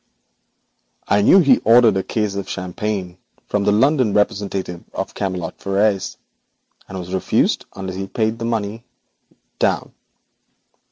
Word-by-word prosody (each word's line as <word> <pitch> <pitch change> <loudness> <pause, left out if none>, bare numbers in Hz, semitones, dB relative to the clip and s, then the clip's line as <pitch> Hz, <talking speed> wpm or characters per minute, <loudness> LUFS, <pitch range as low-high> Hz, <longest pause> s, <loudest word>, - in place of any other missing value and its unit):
'I 100 - +4
knew 185 - +7
he 135 -6 +5
ordered 115 -1 +5
a 95 - +1
case 105 +1 -2
of 100 -1 -5
champagne 95 0 -4 0.3
from 100 -1 -1
the - - +4
London 130 0 +3
representative 100 -4 -1
of - - -4
Camelot 95 -3 -4
Frères, 100 0 0 0.7
and 95 - -6
was 90 0 -6
refused 95 - +1
unless 95 -1 -5
he 95 0 -4
paid 110 +2 -1
the 115 - -3
money 115 -1 -2 0.8
down.' - - 0
100 Hz, 130 wpm, -20 LUFS, 95-110 Hz, 0.8 s, knew